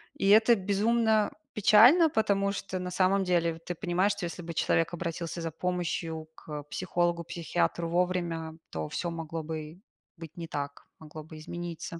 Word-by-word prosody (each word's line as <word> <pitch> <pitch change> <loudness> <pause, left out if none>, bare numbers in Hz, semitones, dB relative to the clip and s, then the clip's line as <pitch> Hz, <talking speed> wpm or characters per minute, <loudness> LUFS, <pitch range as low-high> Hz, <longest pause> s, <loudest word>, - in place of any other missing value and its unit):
И 195 - -1
это 220 +3 +7
безумно 215 +2 +2 0.2
печально, 245 - +7
потому 200 -4 +1
что, 190 -1 -4
на 180 0 -4
самом 190 +1 +2
деле, 170 -2 +1
ты 175 +1 -6
понимаешь, 185 +3 +1
что 175 - -4
если 175 +1 -6
бы 170 0 -6
человек 165 +2 +1
обратился 170 0 -4
за 165 -1 -3
помощью 165 -2 -3
к 150 -2 -7
психологу, 175 +1 -1
психиатру 170 0 -1
вовремя, 170 -2 -1
то 80 -1 -4
всё 170 -1 -3
могло 165 -1 -5
бы 155 +2 -6 0.4
быть 165 0 -11
не 165 -1 -5
так, 145 -1 -5
могло 155 0 -10
бы 160 0 -12
измениться. 170 +1 -6
175 Hz, 160 wpm, -29 LUFS, 160-190 Hz, 0.4 s, это